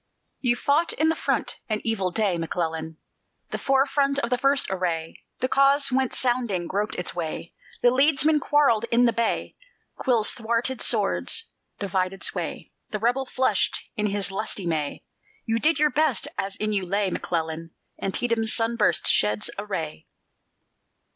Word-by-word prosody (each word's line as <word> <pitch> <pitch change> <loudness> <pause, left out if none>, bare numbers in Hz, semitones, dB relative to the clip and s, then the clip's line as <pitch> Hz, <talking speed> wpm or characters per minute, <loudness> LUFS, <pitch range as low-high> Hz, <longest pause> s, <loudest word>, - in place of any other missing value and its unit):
You 240 -2 +2
fought 295 +7 +1
in 315 +1 +2
the 320 - +1
front - - -1
(an 215 -1 0
evil 210 -5 0
day, 190 -2 0
McClellan) 160 -1 -3 0.5
The - - -3
forefront 275 +1 +2
of 245 -4 -1
the 250 - +3
first 275 +1 +3
assay; 170 -4 -2 0.2
The 255 - +2
Cause 275 +1 +3
went 260 0 +1
sounding, 240 -8 0
groped 205 +5 -2
its 180 - -4
way; 165 0 -5 0.3
The 245 - +6
leadsmen 295 +3 +3
quarrelled 285 -8 +3
in 240 +1 +3
the 235 - +3
bay; 230 0 -1 0.4
Quills 235 -5 +2
thwarted 235 +2 -2
swords; 455 0 +1 0.3
divided 190 -1 -2
sway; - - -4 0.2
The 215 - -2
rebel 245 +5 0
flushed 260 +1 +1 0.2
in 210 -3 0
his 200 -1 +1
lusty 195 -1 -3
May; 155 -4 -2 0.4
You 225 0 0
did 315 +6 +3
your 300 -1 +3
best, 310 -1 +2
as 195 0 -3
in 215 0 -1
you 195 -2 0
lay, 195 +1 0
McClellan. 165 -1 -3 0.3
Antietam's 225 +2 0
sun 230 +1 +1
burst 210 - +2
sheds 105 0 +2
a 205 - -4
ray. 160 -6 -4
225 Hz, 155 wpm, -25 LUFS, 185-265 Hz, 0.5 s, The